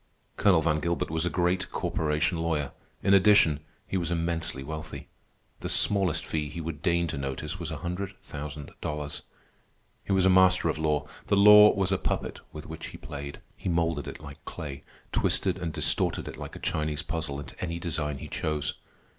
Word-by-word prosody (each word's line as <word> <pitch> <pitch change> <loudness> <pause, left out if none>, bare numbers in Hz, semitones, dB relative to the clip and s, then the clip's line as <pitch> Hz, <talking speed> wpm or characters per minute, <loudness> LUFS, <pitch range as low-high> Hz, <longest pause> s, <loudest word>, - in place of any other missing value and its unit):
Colonel 90 -6 +4
Van 80 -1 +2
Gilbert 85 0 -1
was 80 +2 0
a - - +1
great 90 +2 +1
corporation 80 +3 0
lawyer. 80 -4 -1 0.3
In 100 - +4
addition, 95 -6 +6 0.3
he 95 - -2
was 85 -3 -1
immensely 85 -5 -2
wealthy. 80 +2 -7 0.5
The - - -4
smallest 95 -5 +3
fee 75 -2 -2
he 75 - -6
would 80 -2 -5
deign 85 -1 +2
to 75 -4 -3
notice 70 +5 -4
was 85 -1 -4
a 80 - -4
hundred 95 +4 -4
thousand 75 -1 -7
dollars. 75 -1 -4 0.8
He - - -5
was 95 -1 +4
a - - +6
master 95 -2 +5
of 80 - -2
law. 75 -2 +1 0.2
The 100 - +3
law 105 +1 +9
was 95 -2 +1
a 95 - +2
puppet - - -2
with 75 - -8
which 80 0 -7
he - - -9
played. 70 0 -7
He - - -4
moulded 85 -3 0
it - - -6
like 70 -2 -11
clay, 70 -2 -7 0.3
twisted 95 -1 +1
and 85 -2 -2
distorted - - +1
it - - -6
like - - -8
a - - -8
Chinese 75 -1 -1
puzzle 80 -4 -3
into 70 - -9
any 85 -1 -2
design 75 -4 -2
he - - -7
chose. 75 -2 -1
80 Hz, 190 wpm, -28 LUFS, 75-90 Hz, 0.8 s, law